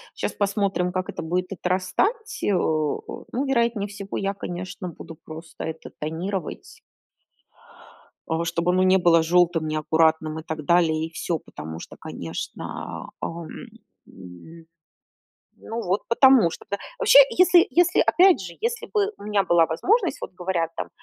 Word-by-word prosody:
Щас -, -, -2 dB
посмотрим, 195 Hz, -3 st, -1 dB
как 185 Hz, -1 st, -2 dB
это -, -, -5 dB
будет 180 Hz, +3 st, -2 dB
отрастать, 195 Hz, -, -1 dB
э, 205 Hz, -, +1 dB
о, 155 Hz, -4 st, -1 dB
ну, 265 Hz, +4 st, 0 dB
вероятнее 235 Hz, -6 st, 0 dB
всего, 200 Hz, -1 st, -6 dB
я, 195 Hz, 0 st, -1 dB
конечно, 180 Hz, -1 st, -6 dB
буду 165 Hz, 0 st, -10 dB
просто 160 Hz, +2 st, -9 dB
это 160 Hz, 0 st, -7 dB
тонировать. 170 Hz, +3 st, -5 dB, 1.5 s
Э, 160 Hz, +1 st, 0 dB
чтоб 170 Hz, +1 st, -1 dB
оно 185 Hz, +1 st, +3 dB
не 185 Hz, 0 st, +5 dB
было 170 Hz, -2 st, +4 dB
желтым, 170 Hz, -1 st, +2 dB
неаккуратным 160 Hz, 0 st, +1 dB
и 160 Hz, -, -9 dB
так 155 Hz, -2 st, -6 dB
далее, 160 Hz, -1 st, +3 dB
и -, -, -17 dB
всё. 165 Hz, 0 st, -2 dB
Потому 80 Hz, -, -9 dB
что -, -, -10 dB
конечно, -, -, -6 dB, 0.2 s
а, -, -, -1 dB
ам, 165 Hz, -1 st, -6 dB, 0.6 s
м. 95 Hz, -, -13 dB, 1.0 s
Ну 230 Hz, +1 st, -4 dB
вот 185 Hz, +3 st, 0 dB
потому 250 Hz, -6 st, +6 dB
что, -, -, -10 dB
да. 200 Hz, -, -1 dB, 0.2 s
Вообще, 445 Hz, -, +6 dB
если 360 Hz, -1 st, +5 dB
если, 350 Hz, +1 st, +3 dB
опять 370 Hz, 0 st, +5 dB
же, 175 Hz, -3 st, -8 dB
если 465 Hz, +1 st, -2 dB
бы 420 Hz, -1 st, +1 dB
у -, -, -13 dB
меня 210 Hz, -1 st, +1 dB
была 170 Hz, -2 st, +4 dB
возможность, 360 Hz, -, +1 dB
вот -, -, -7 dB
говорят 175 Hz, -2 st, -1 dB
там: -, -, -4 dB
180 Hz, 155 wpm, -24 LUFS, 160-205 Hz, 1.5 s, потому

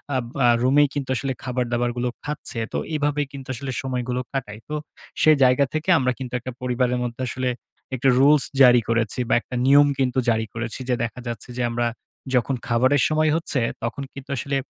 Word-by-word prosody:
আব 125 Hz, -2 st, -1 dB, 0.2 s
আ -, -, +6 dB, 0.2 s
রুমেই 145 Hz, +3 st, +5 dB
কিন্তু 140 Hz, -2 st, -4 dB
আসলে 135 Hz, +1 st, -2 dB
খাবার-দাবার 120 Hz, -1 st, -1 dB
গুলো 125 Hz, 0 st, 0 dB, 0.2 s
খাচ্ছে। 145 Hz, -5 st, -4 dB
তো -, -, 0 dB, 0.2 s
এভাবেই 145 Hz, -1 st, 0 dB
কিন্তু 135 Hz, -1 st, -9 dB
আসলে 130 Hz, +2 st, -5 dB
সময়গুলো 125 Hz, -1 st, -2 dB
কাটায়। 110 Hz, -5 st, -4 dB
তো 150 Hz, -, -2 dB, 0.5 s
সেই 155 Hz, -1 st, +6 dB
জায়গা 130 Hz, +2 st, +4 dB
থেকে 155 Hz, +4 st, -2 dB
আমরা 125 Hz, -1 st, +1 dB
কিন্তু 125 Hz, -1 st, -6 dB
একটা 130 Hz, +2 st, -6 dB
পরিবারের 125 Hz, 0 st, 0 dB
মধ্যে, 120 Hz, +1 st, -4 dB
আসলে 130 Hz, 0 st, -2 dB, 0.5 s
একটা 130 Hz, +2 st, +2 dB
রুলস 145 Hz, 0 st, +5 dB, 0.2 s
জারি 125 Hz, -2 st, +7 dB
করেছি, 115 Hz, 0 st, 0 dB
বা -, -, +3 dB
একটা 125 Hz, -, -8 dB
নিয়ম 145 Hz, +1 st, +6 dB
কিন্তু 130 Hz, 0 st, +1 dB
জারি 110 Hz, 0 st, +1 dB
করেছি। 120 Hz, +2 st, -4 dB
যে, 125 Hz, -, +3 dB
দেখা 120 Hz, +2 st, -4 dB
যাচ্ছে, 120 Hz, +1 st, -6 dB
যে, -, -, -1 dB
আমরা 120 Hz, 0 st, 0 dB, 0.5 s
যখন 125 Hz, +2 st, +1 dB
খাবারের 130 Hz, +3 st, +3 dB
সময় 155 Hz, 0 st, +2 dB
হচ্ছে, 150 Hz, -6 st, 0 dB, 0.2 s
তখন 120 Hz, +4 st, -3 dB
কিন্তু 140 Hz, 0 st, -11 dB
আসলে 140 Hz, +3 st, -2 dB
130 Hz, 190 wpm, -23 LUFS, 120-140 Hz, 0.5 s, জারি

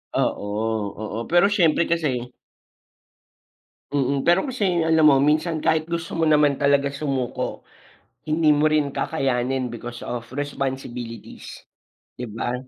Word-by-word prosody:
Oo, 100 Hz, -, 0 dB, 0.5 s
oo. 110 Hz, +2 st, -5 dB
Pero 175 Hz, +4 st, +4 dB
syempre 170 Hz, -5 st, +3 dB
kasi 135 Hz, -7 st, -1 dB, 1.6 s
Mm, 140 Hz, -1 st, 0 dB
pero 175 Hz, +2 st, +5 dB
kasi 250 Hz, -5 st, -1 dB, 0.2 s
alam 160 Hz, -1 st, +4 dB
mo 145 Hz, -, +7 dB
minsan 155 Hz, +1 st, +1 dB
kahit 160 Hz, 0 st, +1 dB
gusto 170 Hz, 0 st, -4 dB
mo 165 Hz, -, +3 dB
naman 150 Hz, -2 st, +3 dB
talaga 140 Hz, 0 st, +2 dB
sumuko, 140 Hz, -3 st, -3 dB, 0.6 s
hindi 155 Hz, 0 st, +3 dB
mo 150 Hz, +1 st, +4 dB
rin 155 Hz, -2 st, +2 dB
kakayanin 130 Hz, -4 st, -1 dB
because 120 Hz, +1 st, -8 dB
of 120 Hz, -1 st, -5 dB
responsibilities, 130 Hz, -4 st, -5 dB, 0.6 s
di 125 Hz, -, -4 dB
ba? 115 Hz, +3 st, -3 dB
145 Hz, 125 wpm, -23 LUFS, 125-160 Hz, 1.6 s, mo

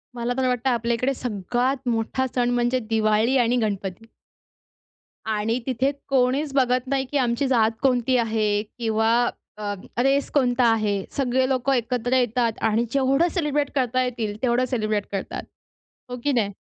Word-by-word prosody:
मला 240 Hz, +1 st, -2 dB
तर 260 Hz, -1 st, +1 dB
वाटतं, 250 Hz, +1 st, 0 dB
आपल्या 235 Hz, -1 st, 0 dB
इकडे 255 Hz, +4 st, 0 dB
सगळ्यात 250 Hz, +3 st, -2 dB
मोठा 230 Hz, +3 st, 0 dB
सण 245 Hz, -1 st, +2 dB
म्हणजे 245 Hz, +1 st, +1 dB
दिवाळी 220 Hz, +3 st, +2 dB
आणि 245 Hz, 0 st, +2 dB
गणपती. 200 Hz, -1 st, -3 dB, 1.2 s
आणि 220 Hz, +2 st, -1 dB
तिथे 260 Hz, +1 st, 0 dB, 0.2 s
कोणीच 270 Hz, +2 st, +1 dB
बघत 255 Hz, -1 st, +2 dB
नाही, 270 Hz, 0 st, 0 dB
की 290 Hz, -, +1 dB
आमची 250 Hz, +1 st, +1 dB
जात 225 Hz, -4 st, +3 dB
कोणती 255 Hz, -1 st, +2 dB
आहे 215 Hz, -3 st, +1 dB
किंवा 220 Hz, 0 st, -1 dB, 0.5 s
अ, 205 Hz, -1 st, -3 dB, 0.3 s
रेस 275 Hz, +1 st, +2 dB
कोणता 250 Hz, -3 st, +3 dB
आहे. 205 Hz, -3 st, 0 dB
सगळे 260 Hz, -1 st, +1 dB
लोकं 265 Hz, +1 st, +1 dB
एकत्र 245 Hz, 0 st, -1 dB
येतात 245 Hz, -1 st, +1 dB, 0.2 s
आणि 225 Hz, +2 st, +1 dB
जेवढं 275 Hz, +5 st, +2 dB
सेलिब्रेट 295 Hz, -5 st, 0 dB
करता 255 Hz, -1 st, +1 dB
येईल, 230 Hz, -4 st, -3 dB
तेवढं 250 Hz, 0 st, +2 dB
सेलिब्रेट 215 Hz, -5 st, -1 dB
करतात. 195 Hz, -1 st, -4 dB, 0.7 s
हो, 250 Hz, -, -5 dB
की 290 Hz, -, +2 dB
नाही? 210 Hz, -5 st, 0 dB
245 Hz, 150 wpm, -23 LUFS, 225-260 Hz, 1.2 s, जात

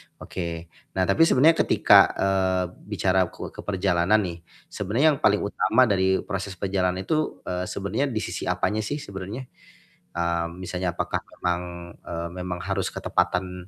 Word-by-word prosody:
oke. 85 Hz, -2 st, -6 dB, 0.2 s
Nah 95 Hz, -, +2 dB
tapi 100 Hz, -, +4 dB
sebenarnya 160 Hz, +5 st, +5 dB
ketika, -, -, +7 dB
eee, 95 Hz, -1 st, +1 dB, 0.2 s
bicara 95 Hz, -3 st, +2 dB
ke -, -, -8 dB
ke -, -, -16 dB
perjalanan 95 Hz, +1 st, +2 dB
nih, 85 Hz, -2 st, -5 dB, 0.3 s
sebenarnya 110 Hz, +10 st, +1 dB
yang 145 Hz, -, -2 dB
paling 105 Hz, -8 st, +3 dB
utama 130 Hz, -, +3 dB
dari 95 Hz, -4 st, +2 dB
proses 100 Hz, -1 st, -4 dB
perjalanan 95 Hz, -1 st, -1 dB
itu, 155 Hz, +9 st, -1 dB
eee, 90 Hz, 0 st, -3 dB
sebenarnya 100 Hz, +8 st, -1 dB
di 115 Hz, -5 st, -2 dB
sisi -, -, -4 dB
apanya 105 Hz, -, 0 dB
sih 145 Hz, +7 st, -3 dB
sebenarnya? 100 Hz, +6 st, -6 dB, 0.7 s
Mmm, 85 Hz, 0 st, -1 dB
misalnya 90 Hz, -1 st, -3 dB
apakah -, -, -1 dB, 0.2 s
memang, 90 Hz, 0 st, -1 dB, 0.5 s
eee, 85 Hz, 0 st, -4 dB
memang 90 Hz, -1 st, -4 dB
harus 100 Hz, -, 0 dB
ketepatan, 90 Hz, 0 st, -1 dB
95 Hz, 150 wpm, -25 LUFS, 90-105 Hz, 0.7 s, ketika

